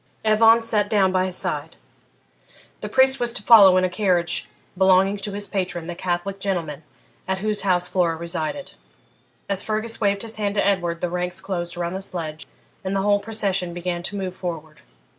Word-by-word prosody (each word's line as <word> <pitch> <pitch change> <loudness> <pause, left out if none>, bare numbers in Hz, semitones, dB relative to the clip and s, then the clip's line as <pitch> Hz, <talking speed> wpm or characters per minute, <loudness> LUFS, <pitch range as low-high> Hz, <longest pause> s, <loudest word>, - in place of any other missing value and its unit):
Evan 225 +1 +5
sat 210 -3 0
down 200 -4 +3
by 185 0 +1
his 185 -1 -3
side. - - -2 1.0
The - - -6
priest 265 0 +4
was 240 -1 -1
to 220 - -4
follow 200 -5 +8
in 185 - +2
a - - +3
carriage 180 -2 0 0.3
belonging 190 +1 +4
to 205 +1 -4
his 205 0 -3
patron, 180 -4 -3
the 175 - -5
Catholic 180 +2 -3
gentleman 170 -7 -3 0.5
at 190 0 -1
whose 210 +1 -1
house 180 -2 +1
Flora 175 -3 +1
resided. 170 - -4 0.8
As 195 -1 0
Fergus 220 +1 -3
waved 200 0 +1
his 225 -1 -2
hand 205 -1 -2
to 205 - +1
Edward 175 -4 0
the 180 - -1
ranks 180 +1 -2
closed 175 -3 -4
around 175 0 -3
the 190 - -4
sledge, 160 -5 -4 0.4
and 190 +1 -2
the 195 - 0
whole 205 0 +3
procession 200 -5 -2
began 175 0 -3
to 190 +3 -5
move 190 -2 -4
forward. 160 -4 -6
190 Hz, 185 wpm, -22 LUFS, 175-205 Hz, 1.0 s, follow